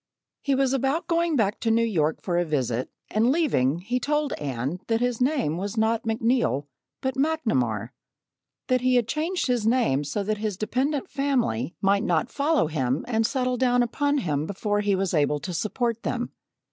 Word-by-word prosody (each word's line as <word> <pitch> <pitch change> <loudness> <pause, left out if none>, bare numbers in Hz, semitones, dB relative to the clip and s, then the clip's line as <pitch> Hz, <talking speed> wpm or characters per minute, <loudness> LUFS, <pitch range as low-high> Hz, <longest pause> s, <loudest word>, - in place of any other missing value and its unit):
He 280 -1 +1
was 265 -1 +2
about 270 +5 0
going 335 -1 +1
back 210 -5 +1
to 230 - 0
New 230 +1 +3
York 160 -8 0
for 175 -2 0
a - - +2
visit 130 -6 -1 0.2
and 225 +4 +3
leaving 175 - +1
he 245 +7 -1
told 295 +2 0
Anne 135 +4 -3
that 225 -1 +1
his 245 0 -1
name 250 - +1
was 200 +4 -4
not 220 +1 +1
McNeil, 225 - +1 0.4
but 265 0 -1
McNamar 220 - 0 0.8
that 255 -1 +2
he 255 0 +3
had 240 -3 +3
changed 325 +7 -1
his 245 -4 +1
name 225 - +2
so 175 +8 -2
that 215 +1 -2
his 210 -3 -2
dependent 260 +7 -1
family 245 - -1
might 200 +1 +3
not 175 +7 0
follow 295 - +2
him 135 -3 -1
and 225 -2 +1
settle 255 -2 0
down 245 -1 +3
upon 285 +5 0
him 155 - -1
before 205 +2 -1
he 205 -1 +2
was 190 -1 -1
able 150 -2 +2
to 180 +4 -5
support 230 +5 -1
them. 245 -1 -2
225 Hz, 185 wpm, -25 LUFS, 175-260 Hz, 0.8 s, New